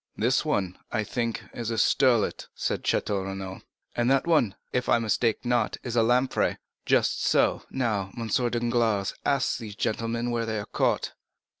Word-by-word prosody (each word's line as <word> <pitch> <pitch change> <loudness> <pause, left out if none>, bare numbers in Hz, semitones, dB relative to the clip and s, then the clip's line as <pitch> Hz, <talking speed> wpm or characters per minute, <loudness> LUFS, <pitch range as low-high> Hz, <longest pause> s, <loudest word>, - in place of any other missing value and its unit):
"This 125 +4 +2
one 100 - -1
is, - - -31
I 110 -2 0
think, 115 +2 -2
a 120 - -5
sterlet," 120 -2 +2
said - - -2
Château 100 -2 0
Renaud. 95 0 -6 0.3
"And 120 +1 +1
that 135 0 +3
one, 150 - +3 0.2
if 125 0 0
I - - +5
mistake 115 +1 0
not, 120 -1 +1
a - - -3
lamprey." 125 +3 +2 0.3
"Just - - +2
so. - - +3
Now, 110 -7 -1
M. 115 -1 -3
Danglars, 120 -3 +1
ask 140 -2 +1
these 105 -4 -7
gentlemen 115 +3 -1
where 115 -1 -1
they 110 -1 -1
are 105 - -4
caught." - - 0
115 Hz, 160 wpm, -27 LUFS, 105-125 Hz, 0.3 s, I